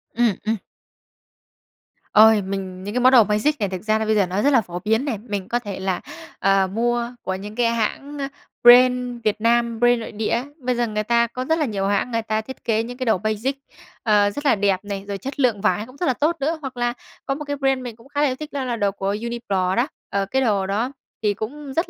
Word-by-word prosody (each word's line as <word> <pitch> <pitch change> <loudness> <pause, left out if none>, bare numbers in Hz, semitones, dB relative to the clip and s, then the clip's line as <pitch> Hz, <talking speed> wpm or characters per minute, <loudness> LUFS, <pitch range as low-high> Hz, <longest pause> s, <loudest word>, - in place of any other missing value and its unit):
Ừm, 235 -4 +3
ừm. 225 - +2 1.6
Ôi, 220 0 +7
mình 190 -1 -5
những 205 +2 -5
cái 250 - +1
món 255 +1 +6
đồ 240 -4 +8
basic 215 +9 +1
này 205 - 0
thực 185 -1 -5
ra 215 0 +2
là 220 - -1
bây 215 0 +2
giờ 200 - +3
nó 185 +3 -1
rất 285 - +4
là 235 - +5
phổ 175 -2 -6
biến 220 +7 +1
này. 240 -7 -2
Mình 205 -3 -5
có 240 - +1
thể 205 -5 -6
là, 190 -1 -1 0.4
à, 195 -1 +3
mua 235 +3 -1
của 190 - -2
những 205 +3 -8
cái 235 -1 +2
hãng, 275 +6 -2
a, 275 - -1 0.4
brand 250 0 +6
Việt 215 0 0
Nam, 235 0 +2
brand 240 0 +4
nội 225 - -7
địa 215 0 -3
á. 245 +3 0
Bây 250 -1 -1
giờ 240 -1 0
người 215 0 -2
ta 235 +1 +2
có 255 +2 -5
rất 320 +2 +1
là 300 - +2
nhiều 195 -4 -2
hãng 205 +4 0
người 230 0 0
ta 220 0 -1
thiết 260 +4 -10
kế 225 -1 +1
những 245 +1 -7
cái 255 - -3
đồ 220 -4 +3
basic, 215 +7 -2 0.5
ờ, 205 -2 +4
rất 290 +8 -6
là 270 - +5
đẹp 195 -2 +1
này, 200 -1 -5
rồi 200 -1 -3
chất 270 +8 -7
lượng 235 -7 +2
vải 210 0 +1
cũng 255 +3 -15
rất 355 - -1
là 260 - +3
tốt 305 +7 +1
nữa. 315 +4 0
Hoặc 260 -3 -7
là 240 0 0 0.3
có 275 - -1
một 300 - -6
cái 285 0 -2
brand 270 -1 +1
mình 240 -3 -7
cũng 230 +3 -19
khá 290 0 -1
là 295 - +4
yêu 255 - -1
thích 305 +2 -9
đó 280 -2 -2
là 245 -2 -2
đồ 205 -3 +1
của 195 0 -2
Uniqlo 205 -5 -1
đó. 245 +5 +2 0.2
Ờ, 200 0 0
cái 265 +7 0
đồ 205 -6 +1
đó 220 +6 -1 0.3
thì 205 -1 +2
cũng 270 +7 -6
rất 330 +4 0
230 Hz, 260 wpm, -22 LUFS, 205-255 Hz, 1.6 s, đồ